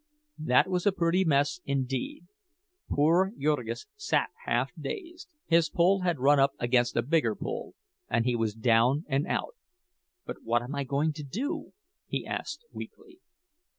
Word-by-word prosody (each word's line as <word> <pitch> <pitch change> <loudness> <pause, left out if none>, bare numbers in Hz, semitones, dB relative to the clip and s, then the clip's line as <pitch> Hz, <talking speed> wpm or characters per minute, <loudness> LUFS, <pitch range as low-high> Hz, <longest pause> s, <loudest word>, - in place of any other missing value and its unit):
That 155 +3 +4
was 180 0 0
a - - +6
pretty 180 0 +2
mess, 145 -1 +2
indeed. 135 +3 -2 0.6
Poor 170 +7 +3
Jurgis 150 - -1
sat 380 -4 0 0.2
half - - +1
dazed. 350 -5 -7 0.2
His 165 -1 +3
pull 185 +3 +3
had 175 -3 +1
run 140 +2 +4
up 135 0 +4
against 120 0 +1
a 120 - +3
bigger 125 -5 +2
pull, - - -5 0.3
and 115 - +1
he 125 -1 +2
was 110 -2 -1
down 120 +6 +3
and 140 0 0
out! - - -2 0.7
"But - - -6
what 120 +1 +1
am 125 +4 -6
I 140 -1 -2
going 140 +4 0
to 150 0 -7
do?" 275 - -4 0.3
he - - -3
asked, 475 - -5
weakly. 370 -4 -10
150 Hz, 155 wpm, -29 LUFS, 130-185 Hz, 0.7 s, a